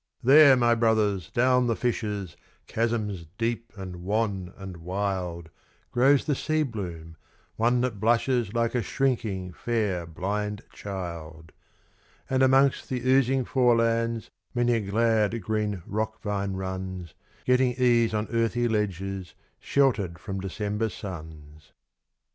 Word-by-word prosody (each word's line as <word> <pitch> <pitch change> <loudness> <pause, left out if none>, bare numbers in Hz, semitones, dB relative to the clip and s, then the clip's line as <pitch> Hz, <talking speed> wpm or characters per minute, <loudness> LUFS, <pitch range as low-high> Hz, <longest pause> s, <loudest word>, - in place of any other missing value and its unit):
There, 140 +1 +8
my 120 -1 +4
brothers, 110 -6 +1
down 125 +3 +3
the 115 - +1
fissures, 105 -7 -2 0.3
chasms 110 -6 -2
deep 115 0 -2
and 95 -2 -7
wan 95 -1 -1
and 95 -3 -8
wild, 90 -2 -3 0.4
Grows 135 +3 +4
the 150 - +1
sea 155 +3 0
bloom, 85 - -6 0.4
one 120 +2 +2
that 125 -5 -2
blushes 120 0 +2
like 115 0 0
a 125 - +1
shrinking, 105 -7 -1
fair, 105 -8 -1
blind 100 +5 -3
child; 85 -5 -7 0.8
And 130 0 +2
amongst 135 +1 +4
the 125 -1 -2
oozing 130 0 +3
forelands 115 -2 +1 0.2
many 120 0 +2
a 115 - +2
glad, 110 +2 +1
green 105 -4 -2
rock 110 +2 -3
vine 100 -2 -2
runs, 95 -2 -5 0.3
Getting 125 0 +3
ease 120 -2 +3
on 105 0 -1
earthy 115 +1 +1
ledges, 95 -4 -2 0.2
sheltered 110 -11 +1
from 95 +1 -5
December 105 +3 -2
suns. 80 -6 -10
110 Hz, 125 wpm, -26 LUFS, 95-120 Hz, 0.8 s, There